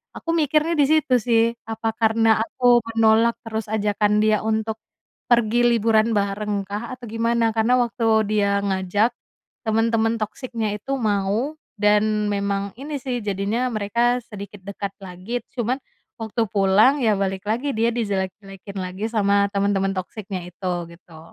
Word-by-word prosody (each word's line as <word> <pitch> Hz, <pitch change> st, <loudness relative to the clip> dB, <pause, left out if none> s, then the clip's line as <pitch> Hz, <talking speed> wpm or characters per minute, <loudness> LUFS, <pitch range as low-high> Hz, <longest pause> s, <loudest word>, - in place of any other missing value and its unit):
aku -, -, -8 dB
mikirnya 310 Hz, +1 st, +2 dB
di 290 Hz, -, +5 dB
situ 305 Hz, -4 st, +3 dB
sih, 230 Hz, 0 st, +3 dB, 0.2 s
apa 225 Hz, 0 st, -2 dB
karena 225 Hz, 0 st, +3 dB
aku 245 Hz, 0 st, +3 dB, 0.2 s
menolak 225 Hz, +1 st, +4 dB
terus 220 Hz, 0 st, -3 dB
ajakan 210 Hz, 0 st, +1 dB
dia 215 Hz, -1 st, +3 dB
untuk 220 Hz, 0 st, -1 dB, 0.5 s
pergi 240 Hz, 0 st, +3 dB
liburan 225 Hz, -1 st, +3 dB
barengkah, 205 Hz, +2 st, -2 dB
atau 245 Hz, -, -10 dB
gimana. 230 Hz, 0 st, +1 dB
Karena 225 Hz, +3 st, +3 dB
waktu 235 Hz, 0 st, -2 dB, 0.2 s
dia 200 Hz, -1 st, +2 dB
ngajak, 195 Hz, +3 st, +1 dB, 0.6 s
temen-temen 225 Hz, +1 st, +2 dB
toxic-nya 220 Hz, 0 st, -3 dB
itu 270 Hz, +6 st, -5 dB
mau, 215 Hz, +5 st, 0 dB, 0.2 s
dan 210 Hz, 0 st, +2 dB
memang 200 Hz, 0 st, -1 dB
ini 290 Hz, +1 st, -4 dB
sih, 250 Hz, -1 st, -2 dB
jadinya 205 Hz, +5 st, -1 dB
mereka 235 Hz, +4 st, +1 dB
sedikit 205 Hz, -2 st, -10 dB
dekat 200 Hz, 0 st, -5 dB
lagi, 190 Hz, +6 st, -5 dB, 0.2 s
cuman 245 Hz, +2 st, 0 dB, 0.4 s
waktu 225 Hz, +1 st, -1 dB
pulang, 210 Hz, +7 st, +4 dB
ya, 215 Hz, -4 st, +2 dB
balik 195 Hz, 0 st, -2 dB
lagi, 265 Hz, +6 st, -1 dB
dia 230 Hz, +2 st, +2 dB
dijelek-jelekin 195 Hz, -2 st, -4 dB
lagi 185 Hz, +3 st, -4 dB
sama 200 Hz, -2 st, +2 dB
temen-temen 200 Hz, -1 st, +1 dB
toxic-nya 185 Hz, -1 st, -5 dB
itu, 180 Hz, +1 st, -4 dB, 0.2 s
gitu. 170 Hz, -2 st, -16 dB
215 Hz, 140 wpm, -22 LUFS, 200-235 Hz, 0.6 s, di